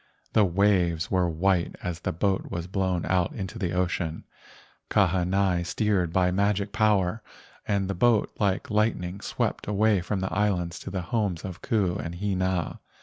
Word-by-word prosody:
The 110 - +5
waves 90 -3 +2
were 90 -2 +2
white 85 +1 +1
as 85 -2 -3
the - - -2
boat 95 +3 0
was 85 0 -4
blown 95 -2 -1
out 90 -2 +1
into 100 +3 -5
the 90 -5 -1
ocean. 90 -3 -1 0.7
Ka¬ 100 -2 +4
hanai 90 0 +1
steered 95 -2 0
by 90 +1 +2
magic 100 +1 +1
power, 105 -1 +2 0.5
and 100 -2 +1
the 100 - -1
boat 115 +3 +3
like 100 0 0
lightning 100 -3 0
swept - - -2
away 105 -1 +3
from 95 +3 -2
the 95 0 -3
islands 90 -5 0
to - - -7
the 95 -1 -3
homes 100 -3 -1
of 90 -3 -7
Ku 100 -7 +1
and 85 -3 -5
Hina. 95 -2 -1
95 Hz, 165 wpm, -26 LUFS, 90-100 Hz, 0.7 s, The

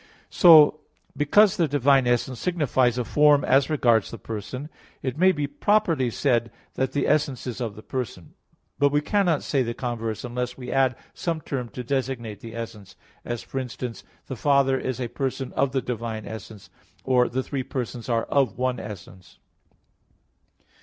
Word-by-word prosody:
So, 155 -4 +7 0.4
because 190 +8 +4
the 170 - +2
divine 135 -2 +3
essence 120 0 0
signifies 130 -7 +1
a 125 - 0
form 150 +1 +4
as 135 +2 +3
regards 120 -8 +2
the 115 - -8
person, 115 +7 -6 0.4
it 130 -2 -2
may 185 +4 +5
properly 165 -1 +1
be - - 0
said 120 -1 +1 0.2
that 130 0 -2
the 145 - 0
essence 145 -4 0
is 125 -1 -5
of 110 -4 -3
the 110 - -12
person; 115 - -5 0.5
but 140 -1 +4
we 145 - +3
cannot 175 -1 +1
say 140 - 0
the 115 -1 -2
converse, 115 -3 -4
unless 125 0 -4
we 125 -1 -7
add 130 -2 +2 0.2
some 165 -2 -2
term 130 -5 -4
to 125 - -7
designate 125 -5 -3
the 115 0 -10
essence; 105 -5 -8 0.3
as, 120 -1 -4
for 135 - -4
instance, 125 -2 -6 0.2
the 130 - -6
Father 140 +1 +3
is 130 -1 -3
a 125 - -2
person 135 +1 -4
of 140 - +1
the 135 -2 -1
"divine 115 -3 -4
essence"; 110 -2 -10 0.3
or, 125 -2 +3
the 130 +2 -2
three 135 0 -3
persons 125 -2 -5
are 115 -1 +1
"of 135 -7 +1
one 125 -1 -1
essence." 95 -3 -10
130 Hz, 170 wpm, -25 LUFS, 115-140 Hz, 0.5 s, So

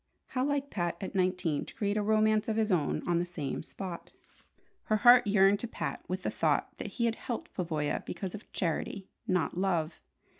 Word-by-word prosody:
How 255 - 0
like 280 0 -1
Pat 175 -3 -1
at 190 - -5
nineteen 180 -5 +1
to - - -11
create 205 -1 0
a 215 - +1
romance 215 0 +3
of 220 - 0
his 220 -1 +1
own 160 -6 0
on 170 -1 +2
the - - +1
same 170 -6 -4
spot! 175 +1 -7 0.8
Her 215 - +2
heart 245 +1 +7
yearned 200 0 +5
to 235 - -3
Pat - - -4
with - - -3
the - - -1
thought - - +1
that - - -5
he 235 - +2
had 230 - +2
helped 235 0 -5
Pavoya 155 -5 -1
because 190 -3 -5
of 215 - -10
charity, 185 +2 -2 0.2
not 180 -5 +1
love. 170 -4 0
195 Hz, 195 wpm, -31 LUFS, 175-215 Hz, 0.8 s, heart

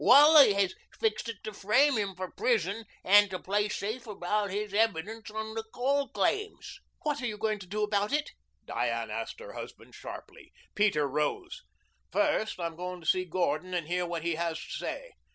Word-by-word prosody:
Wally 290 -2 +9
has 195 -2 +1 0.3
fixed 440 - 0
it 225 -3 -7
to 215 - -5
frame 260 +9 +3
him 200 -3 -1
for 185 0 -5
prison 220 -2 0 0.2
and 205 +1 +6
to 185 - -3
play 205 +3 0
safe 220 +4 -4
about 205 0 -1
his 205 +1 -3
evidence 220 +1 0
on 220 +1 -5
the 225 0 -3
coal 275 +3 +1
claims." 420 0 -2 0.2
"What 295 -2 -1
are 245 - -1
you 215 -2 -4
going 215 0 -1
to 185 - -10
do 210 +3 -2
about 205 0 +1
it?" 300 +1 0 0.3
Diane - - -2
asked - - -4
her - - -9
husband - - -9
sharply. - - -10 0.2
Peter 195 -9 +2
rose. 150 - -2 0.5
"First 300 -11 +1
I'm 170 -1 -3
going 180 +1 -5
to - - -14
see 185 0 +3
Gordon 180 0 -1
and 170 -3 -1
hear 180 +2 -1
what 170 -2 -4
he 170 0 0
has 165 0 -2
to - - -9
say. - - -5
210 Hz, 190 wpm, -30 LUFS, 180-240 Hz, 0.5 s, Wally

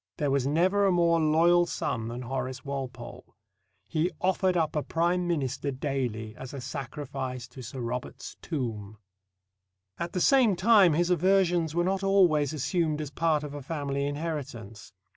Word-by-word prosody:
There 145 -3 0
was 135 -1 +1
never 185 +7 +3
a - - +3
more 170 -1 +3
loyal 170 +3 +4
son 115 -9 -3
than 120 +2 -5
Horace 130 +1 -4
Walpole. 130 -3 -7 0.5
He 160 +7 0
offered 185 -1 +1
up 160 -2 0
a 150 - +1
Prime 175 +3 0
Minister 140 -4 -1
daily 130 -6 -3
as 130 +1 -8
a - - -5
sacrifice 130 -1 -5
at 130 - -8
Sir 125 +2 -7
Robert's 120 +1 -5
tomb. 110 - -4 1.0
At 170 - -4
the 180 - -1
same 245 -1 +4
time, 195 -3 +5
his 175 +3 +1
aversions 175 -2 +2
were 175 - +2
not 190 +1 0
always 180 -8 +3
assumed 155 +1 -1
as 150 -2 -5
part 155 0 +1
of 145 -1 -6
a 145 - -6
family 140 -1 -2
inheritance. 145 -8 -5
150 Hz, 160 wpm, -28 LUFS, 130-175 Hz, 1.0 s, time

